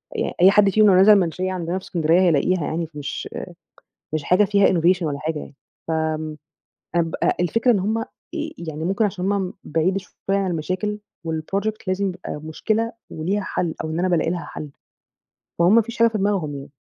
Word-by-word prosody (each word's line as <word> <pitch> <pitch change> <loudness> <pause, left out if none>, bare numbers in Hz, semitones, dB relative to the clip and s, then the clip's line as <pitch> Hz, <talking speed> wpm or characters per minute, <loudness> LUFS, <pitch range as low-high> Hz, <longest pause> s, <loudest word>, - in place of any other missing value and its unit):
يعني - - -1
أي 190 +2 +8
حد 205 -1 +5
فيهم 215 +2 +5
لو 190 - +6
نزل 195 +3 +8
المنشية 185 -1 +1
عندنا 175 0 -2
في - - -18
اسكندرية 165 -1 +2
هيلاقيها 175 0 +2
يعني، 165 0 -2
فمش 145 -2 -6 0.8
مش 155 -2 -1
حاجة 185 +7 +4
فيها 200 0 +4
innovation 180 +1 +3
والا 145 -2 -2
حاجة 155 0 -2
يعني، 140 - -10 0.3
ف - - -1 1.1
أنا 170 - +5
بقى 165 - 0
الفكرة 230 +8 +2
إن 205 - +2
هُم 215 +4 0
آآ 225 - -2 0.5
يعني 160 -2 -5
ممكن 195 +5 +1
علشان 195 -1 -1
هُم 190 -2 -1
بعيد 165 +5 +1
شوية 195 +1 -4
عن 195 -2 0
المشاكل، 185 +6 -2 0.3
والproject 195 +7 -2
لازم 190 +1 0
يبقى 180 -4 -6
مشكلة 220 +8 -1 0.2
وليها 185 +6 -1
حل 170 -3 -2
أو 160 - -3
إن 160 - -2
أنا 185 - +1
بالاقي 170 -2 +1
لها 175 -1 -3
حل، 150 -2 -7 0.9
فهُم 175 +5 +5
ما 230 - +6
فيش 235 +2 -9
حاجة 230 0 +6
في 220 -2 -3
دماغهم 190 -7 0
يعني. 135 0 -9
185 Hz, 190 wpm, -22 LUFS, 165-200 Hz, 1.1 s, أي